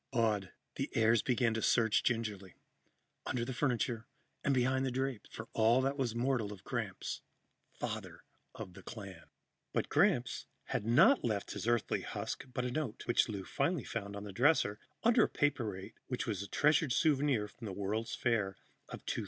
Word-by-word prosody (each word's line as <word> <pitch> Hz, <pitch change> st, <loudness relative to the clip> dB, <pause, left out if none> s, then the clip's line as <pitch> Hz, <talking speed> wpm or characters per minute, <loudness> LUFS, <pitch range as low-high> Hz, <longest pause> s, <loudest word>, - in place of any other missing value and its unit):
Awed, 110 Hz, -5 st, +1 dB, 0.3 s
the -, -, -1 dB
heirs 115 Hz, 0 st, +4 dB
began 120 Hz, -2 st, +2 dB
to 110 Hz, -, -1 dB
search 115 Hz, -2 st, +3 dB
gingerly, 105 Hz, -6 st, -2 dB, 0.7 s
under 120 Hz, -2 st, -1 dB
the 130 Hz, -, -4 dB
furniture 120 Hz, -3 st, 0 dB, 0.4 s
and 140 Hz, -, +2 dB
behind 130 Hz, 0 st, +2 dB
the 135 Hz, -, +1 dB
drapes, 130 Hz, -2 st, -2 dB
for 110 Hz, -, -7 dB
all 115 Hz, +3 st, +4 dB
that 135 Hz, +1 st, +1 dB
was 125 Hz, -5 st, -1 dB
mortal 120 Hz, -4 st, 0 dB
of 100 Hz, -3 st, -10 dB
Gramps, -, -, -3 dB, 0.5 s
father -, -, -5 dB, 0.3 s
of 90 Hz, -, -7 dB
the -, -, -11 dB
clan. 100 Hz, -7 st, -9 dB, 0.5 s
But -, -, 0 dB
Gramps -, -, +2 dB, 0.2 s
had -, -, -1 dB
left 245 Hz, -, +6 dB
not 105 Hz, -3 st, -2 dB
his -, -, -4 dB
Earthly 120 Hz, -1 st, +1 dB
husk -, -, -4 dB
but 125 Hz, 0 st, -2 dB
a 125 Hz, -, -1 dB
note, 150 Hz, -5 st, -3 dB
which 120 Hz, -, +3 dB
Lou 100 Hz, -3 st, -4 dB
finally 170 Hz, -5 st, 0 dB
found 100 Hz, -3 st, -4 dB
on 100 Hz, -, -6 dB
the 100 Hz, -2 st, -7 dB
dresser, 120 Hz, -4 st, +3 dB, 0.2 s
under 235 Hz, +1 st, +5 dB
a -, -, +1 dB
paperweight 110 Hz, -10 st, -1 dB
which 125 Hz, 0 st, -2 dB
was 105 Hz, -6 st, -2 dB
a 100 Hz, -, -5 dB
treasured 150 Hz, -, +3 dB
souvenir 140 Hz, -7 st, +2 dB
from 115 Hz, +3 st, -11 dB
the 100 Hz, -, -4 dB
World's 105 Hz, +4 st, -2 dB
Fair 105 Hz, -6 st, 0 dB, 0.3 s
of -, -, -8 dB
2000. -, -, -1 dB
115 Hz, 175 wpm, -34 LUFS, 105-130 Hz, 0.7 s, left